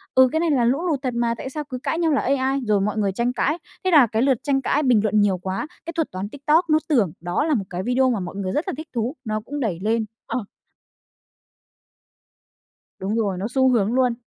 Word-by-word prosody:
ừ, 260 -1 +7
cái 320 - +1
này 335 -2 +1
là 245 -4 +3
lũ 285 +9 +1
lụt 295 -5 0
thật 255 -3 -2
mà, 235 -1 0
tại 265 - -6
sao 300 +2 -4
cứ 255 -3 -6
cãi - - 0
nhau 330 -2 +2
là 280 - +2
AI, 270 +1 +1
rồi 210 -2 +2
mọi 210 +2 -1
người 200 -2 +1
tranh 235 +5 -1
cãi, 300 +6 0 0.3
thế 370 - +1
là 285 -7 +7
cái 220 +1 -1
lượt 265 -3 +3
tranh 275 -2 +1
cãi 295 +3 +1
bình 245 -5 +4
luận 215 0 +3
nhiều 195 -3 +2
quá, 190 - -4 0.2
cái 335 - -5
thuật 325 -2 -1
toán 190 +2 -5
TikTok 305 +5 +1
nó 310 - +5
tưởng 225 - +3
đó 175 - -1
là 315 - +1
một 200 -7 0
cái 180 +1 -4
video 255 +2 +2
mà 225 -5 0
mọi 180 +1 -6
người 190 -2 -3
rất 305 +6 -1
là - - -2
thích 310 0 -7
thú, 235 +5 -1
nó 215 -1 -1
cũng 290 +6 -6
đẩy 195 -9 -1
lên. 220 +1 +1 0.2
Ờ. 235 -5 -3 2.5
Đúng 200 +4 -2
rồi, 200 -5 0
nó 200 +4 -2
xu 260 +1 +3
hướng 225 -2 +2
luôn. 250 -2 +2
250 Hz, 250 wpm, -23 LUFS, 210-285 Hz, 2.5 s, ừ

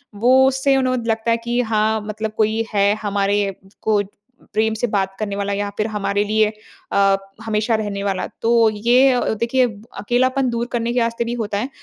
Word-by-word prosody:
वो 255 +5 +5
उससे 270 +1 +2
उन्हें 255 -1 +1
लगता 225 +1 0
है 230 - +3
कि 235 +1 -2
हाँ, 220 -1 0
मतलब 215 +1 -4
कोई 220 +1 +1
है 200 0 +3
हमारे 200 -1 0 0.3
को 215 -2 +2 0.5
प्रेम 220 +1 +1
से 230 +2 -1
बात 195 -2 -1
करने 200 -2 -3
वाला 200 0 -2
या 205 0 -2
फिर 215 +1 0
हमारे 205 -1 -1
लिए 215 +1 +2 0.4
अ, 195 0 +4 0.3
हमेशा 220 +1 0
रहने 205 -2 -3
वाला 195 -2 -1
है। - - -5
तो 230 -1 +4
ये 245 +5 +4
अ, 250 - +1
देखिए 235 +4 +1 0.3
अकेलापन 255 +3 +1
दूर 235 0 -2
करने 235 0 -1
के 245 - +1
रास्ते 230 0 0
भी 235 - -3
होता 215 -4 -3
है। 245 +6 -2
220 Hz, 195 wpm, -20 LUFS, 205-235 Hz, 0.5 s, वो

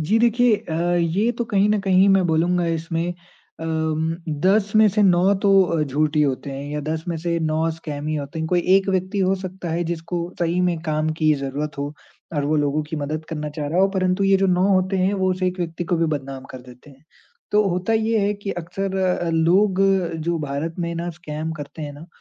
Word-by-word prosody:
जी, 200 +9 +2
देखिए 235 -1 +4
अ, 160 - -8 0.2
ये 175 +7 +1
तो 240 - 0
कहीं 205 -2 +2
न 210 - +2
कहीं 190 0 +4
मैं 195 -2 +4
बोलूँगा 170 +2 +1
इसमें 165 +1 -2 0.5
अम, 160 0 -1 0.3
10 200 +1 +3
में 215 0 +7
से 210 +1 +1
9 185 +1 +4
तो 200 - +4
अ, 165 -3 0
झूठ 150 +2 0
ही 150 - +5
होते 140 0 -1
हैं 135 +1 -6
या 150 - -2
10 160 +1 -2
में 170 - -1
से 170 +1 -1
9 160 +1 0
स्कैम 150 -2 -6
ही 155 - -1
होते 145 +3 -5
हैं। 160 0 -2
कोई 180 -1 +2 0.2
एक 195 0 0
व्यक्ति 190 +1 -1
हो 190 0 +2
सकता 185 -1 -6
है 170 +1 -1
जिसको 170 +1 -3 0.2
सही 175 +1 +1
में 175 -2 +1
काम 155 -1 -1
की 155 0 +4
ज़रूरत 140 +2 -4
हो 145 +1 -3 0.4
और 145 - 0
वो 155 +2 +1
लोगों 145 +1 +1
की 155 +1 -6
मदद 155 +2 -3
करना 150 -2 -4
चाह 150 0 -4
रहा 170 +5 +1
हो 195 - +4
परंतु 190 0 0
ये 195 0 +5
जो 195 0 +2
9 180 +1 +3
होते 190 0 +2
हैं, 185 +2 +2
वो 185 -1 +1
उस 185 0 -3
एक 180 0 0
व्यक्ति 170 0 -3
को 175 0 0
भी 165 0 +1
बदनाम 135 -1 -8
कर 130 - -8
देते 125 +3 -15
हैं। 135 +3 -20 0.5
तो 210 0 +5
होता 180 +5 -1
ये 220 0 +2
है 205 - +1
कि 200 0 -5
अक्सर 195 +3 -4
अ, 180 -2 0
लोग 185 +4 +3 0.5
जो 170 - +1
भारत 150 +2 -3
में 170 -1 -2
ना 170 +1 -3
स्कैम 155 0 -4
करते 155 +1 -8
हैं 145 -1 -5
ना, 150 +4 -12
170 Hz, 230 wpm, -22 LUFS, 155-190 Hz, 0.5 s, में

